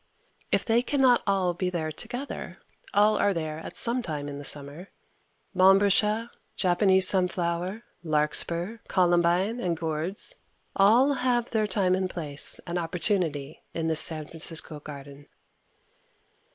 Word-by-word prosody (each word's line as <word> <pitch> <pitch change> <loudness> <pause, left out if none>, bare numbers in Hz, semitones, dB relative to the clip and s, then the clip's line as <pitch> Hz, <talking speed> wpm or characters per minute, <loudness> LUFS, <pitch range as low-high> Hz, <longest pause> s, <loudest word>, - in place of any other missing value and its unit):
If - - +1
they 230 0 +2
can 280 +3 -2
not 255 -2 +4
all 190 -3 +1
be 180 +1 -2
there 160 -3 -3
together, 245 - -7 0.3
all 210 +1 +3
are 200 -2 +1
there 155 -1 -4
at - - -9
some 240 +2 +4
time 150 -8 -5
in 140 0 -7
the - - -8
summer. 145 +6 -4 0.7
Montbretia, 205 +4 +3 0.2
Japanese 190 0 +4
sunflower, 180 +2 0 0.2
larkspur, 170 +6 0
columbine 175 +4 +1
and 175 -6 -2
gourds 165 - -1 0.4
all 235 +8 +4
have 245 -3 -1
their 215 -2 0
time 185 -2 0
and 185 0 -1
place 150 -5 +1
and 175 0 -3
opportunity 165 -4 -2
in 165 -1 -2
this 160 -1 +3
San 155 -3 +2
Francisco 160 -1 -3
garden. 145 -1 -11
180 Hz, 135 wpm, -26 LUFS, 160-210 Hz, 0.7 s, not